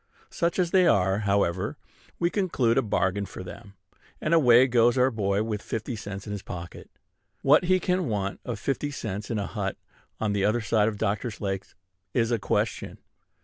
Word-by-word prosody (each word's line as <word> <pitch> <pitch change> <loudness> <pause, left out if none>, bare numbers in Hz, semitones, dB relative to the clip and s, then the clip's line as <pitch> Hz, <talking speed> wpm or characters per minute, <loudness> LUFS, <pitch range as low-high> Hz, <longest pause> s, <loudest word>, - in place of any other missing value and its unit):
Such 170 0 0
as 180 -2 +1
they 185 -2 +5
are, 95 - +3
however, 100 - +1 0.4
we 170 0 +1
conclude 150 - +1
a 135 - +4
bargain 100 -2 0
for - - -8
them; 100 +2 -11 0.4
and 155 - 0
away 125 -6 +7
goes 120 -1 +3
our 130 +1 +4
boy 100 -1 0
with 110 -2 -3
fifty 115 +2 -4
cents 100 -2 -7
in 105 - -6
his 100 -1 -4
pocket. 85 -2 -8 0.5
What 150 +5 +5
he 185 +1 +3
can 180 -2 0
want 100 -3 -2
of 120 - -4
fifty 145 +1 -2
cents 105 -7 -5
in 115 - -1
a 100 - -1
hut 95 -3 -3 0.4
on 105 -2 0
the 100 -1 0
other 110 +4 +2
side 110 -2 +2
of 110 -2 -2
Doctor's 105 +1 -2
Lake 95 -2 -3 0.5
is 115 -1 +2
a 115 - +1
question. - - -1
110 Hz, 190 wpm, -26 LUFS, 100-130 Hz, 0.5 s, away